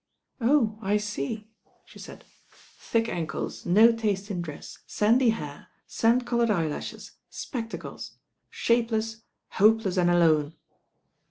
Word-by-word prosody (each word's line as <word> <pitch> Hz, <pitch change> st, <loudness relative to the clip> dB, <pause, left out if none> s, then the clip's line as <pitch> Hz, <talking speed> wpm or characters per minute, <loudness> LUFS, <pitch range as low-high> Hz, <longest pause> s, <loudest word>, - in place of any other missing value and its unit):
"Oh, 230 Hz, -4 st, +2 dB
I 205 Hz, 0 st, +1 dB
see," 210 Hz, +1 st, -4 dB, 0.3 s
she -, -, -15 dB
said. -, -, -11 dB, 0.5 s
"Thick 230 Hz, 0 st, 0 dB
ankles, 165 Hz, -2 st, -4 dB
no 215 Hz, +6 st, +6 dB
taste 210 Hz, -3 st, -2 dB
in 180 Hz, -3 st, -2 dB
dress, 155 Hz, -4 st, -9 dB
sandy 230 Hz, +4 st, +3 dB
hair, 150 Hz, -10 st, -4 dB, 0.2 s
sand 235 Hz, +2 st, +1 dB
coloured 235 Hz, -1 st, +1 dB
eyelashes, 165 Hz, -7 st, -3 dB, 0.2 s
spectacles. 230 Hz, -4 st, -7 dB, 0.3 s
Shapeless, 225 Hz, -1 st, 0 dB, 0.3 s
hopeless 210 Hz, -2 st, +3 dB
and 175 Hz, -1 st, +3 dB
alone." 160 Hz, -3 st, +3 dB
215 Hz, 110 wpm, -26 LUFS, 175-230 Hz, 0.5 s, no